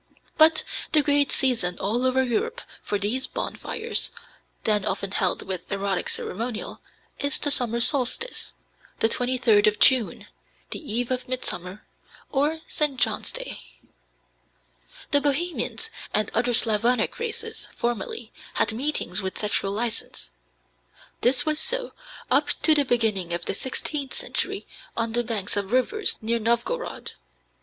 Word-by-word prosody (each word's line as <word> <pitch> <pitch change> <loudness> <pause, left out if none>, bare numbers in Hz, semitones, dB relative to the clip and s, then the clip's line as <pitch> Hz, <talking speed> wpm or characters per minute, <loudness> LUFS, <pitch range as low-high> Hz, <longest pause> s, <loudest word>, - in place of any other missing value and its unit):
But 315 0 +6 0.3
the 305 -2 +5
great 285 -1 +2
season 225 -10 +2
all 235 +6 0
over 260 +1 +2
Europe 450 - -1 0.2
for 205 - -2
these 215 +7 0
bonfires, 460 0 0 0.5
then 210 -2 +2
often 195 0 -2
held 190 -3 +1
with 185 -2 -5
erotic 195 -1 -1
ceremonial, 225 +3 -4 0.4
is 285 -1 0
the 290 - +1
summer 235 -3 +5
solstice, 275 - +1 0.4
the - - +3
23d 240 -3 +3
of 210 0 +2
June, 255 -2 +4 0.5
the - - -3
eve 245 -3 -1
of 255 0 -2
Midsummer, 200 -6 -4 0.5
or 300 +3 +1
St. 295 -3 0
John's - - 0
Day. - - -7 1.5
The 285 - +4
Bohemians 340 +9 -1 0.2
and 210 0 +1
other 240 +1 +1
Slavonic 225 +1 +1
races 465 -2 -4
formerly 240 - -3 0.2
had - - +1
meetings 230 -7 0
with 190 -1 -4
sexual 205 -2 0
license. 225 +2 -2 0.9
This 245 0 +4
was 305 0 +1
so - - +1 0.4
up - - +4 0.2
to 315 - +7
the 290 -2 +3
beginning 215 -8 0
of 170 0 -3
the - - 0
sixteenth 270 +4 -3
century - - -1 0.3
on 230 -1 0
the 240 +1 +1
banks 215 -4 -1
of 200 0 -2
rivers 380 - +2
near 230 +1 0
Novgorod. 235 - -1
245 Hz, 135 wpm, -25 LUFS, 210-290 Hz, 1.5 s, to